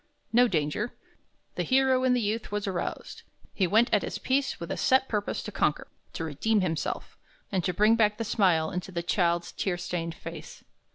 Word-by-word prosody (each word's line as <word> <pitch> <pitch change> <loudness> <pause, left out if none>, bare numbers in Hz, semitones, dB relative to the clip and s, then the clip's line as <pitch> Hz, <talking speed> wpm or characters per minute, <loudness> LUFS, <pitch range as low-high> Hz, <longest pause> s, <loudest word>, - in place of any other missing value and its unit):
No 245 +2 +6
danger. 165 +5 -1 0.6
The - - -2
hero 260 -1 +3
in 255 -1 +4
the 245 - +1
youth 215 +1 -2
was 205 -1 -2
aroused. 190 -3 -4 0.3
He 190 -4 +1
went 220 +6 +4
at 210 - +4
his - - -4
"piece" 265 0 0
with 170 - -6
a - - -1
set 265 0 +3
purpose 210 -2 -2
to 210 - -6
conquer, 155 -6 0 0.3
to - - -4
redeem 180 +8 +1
himself, 165 -4 -3 0.3
and 190 -3 0
to 180 - +1
bring 210 +5 +4
back 210 -2 +2
the 230 - -2
smile 180 -8 +2
into 180 +1 -4
the 170 -1 -3
child's 175 -1 +1
tear 185 -3 -2
stained 170 -2 -4
face. - - -9
200 Hz, 190 wpm, -28 LUFS, 170-230 Hz, 0.6 s, No